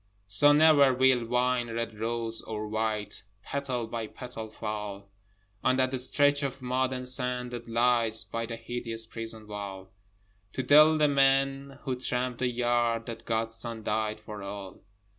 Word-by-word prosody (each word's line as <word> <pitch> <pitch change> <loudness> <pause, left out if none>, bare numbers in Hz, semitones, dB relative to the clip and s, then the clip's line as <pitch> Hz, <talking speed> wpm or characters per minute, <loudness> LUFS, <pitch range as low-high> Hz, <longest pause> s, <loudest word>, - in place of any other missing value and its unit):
So 105 +9 +5
never 145 -3 +6
will 130 -2 +3
wine 125 0 +1
red 115 -1 -4
rose 115 0 -1
or 110 -1 -5
white, 110 -1 -2 0.2
Petal 130 -3 -3
by 115 -1 -5
petal, 115 -2 -8
fall 105 -2 -6 0.5
On 130 0 +3
that 130 0 +1
stretch 145 +3 +3
of 135 -1 -3
mud 130 0 -1
and 125 -1 -2
sand 125 -1 +2
that 120 -1 -7
lies 115 -1 +2
By 115 +2 -4
the 115 - -5
hideous 115 -1 -4
prison 110 -1 -5
wall, 100 -2 -7 0.6
To 130 - -2
tell 155 +4 +6
the 150 -1 +4
men 135 0 +2
who 130 -3 -2
tramp 125 -1 -2
the 130 - +1
yard 120 -1 0
That 115 -1 -8
God's 115 0 -1
Son 115 -1 -4
died 110 0 -1
for 105 -1 -9
all. 100 -1 -8
120 Hz, 160 wpm, -28 LUFS, 110-130 Hz, 0.6 s, never